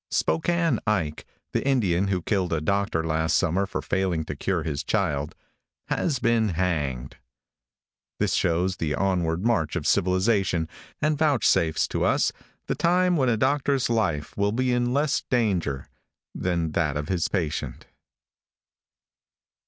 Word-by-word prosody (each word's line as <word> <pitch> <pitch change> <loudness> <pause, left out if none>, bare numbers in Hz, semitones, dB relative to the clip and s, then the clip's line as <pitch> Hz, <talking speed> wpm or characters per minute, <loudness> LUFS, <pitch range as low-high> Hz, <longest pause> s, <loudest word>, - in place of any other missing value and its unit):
|SPOKANE 165 - +1
IKE," 85 -8 0 0.3
the - - 0
Indian 100 -9 +2
who 95 -3 -1
killed 95 -3 0
a 80 - +1
doctor 100 0 0
last 80 0 +1
summer 95 +4 +1
for - - -4
failing 90 -4 0
to 75 - -5
cure 85 +3 -1
his 75 -3 -3
child, 75 -9 -1 0.5
has 150 -6 0
been 115 -3 +2
hanged. 75 -8 -2 1.0
This - - +1
shows 90 +2 +1
the 75 -3 -1
onward 90 0 0
march 90 -11 +1
of 85 -5 -3
civilization, 95 -1 +2 0.4
and 150 -1 +1
vouchsafes 120 - +2
to - - -1
us - - +2 0.3
the - - -1
time 180 +1 +2
when 130 -5 +2
a 115 - +2
doctor's 135 0 +1
life 85 -10 -1
will 100 0 +1
be 125 +2 0
in 120 0 +1
less 145 +2 +1
danger 95 - 0 0.5
than 85 -3 -1
that 75 -3 0
of 75 0 -4
his 90 -2 0
patient. 75 -8 -3
95 Hz, 140 wpm, -25 LUFS, 80-120 Hz, 1.0 s, Indian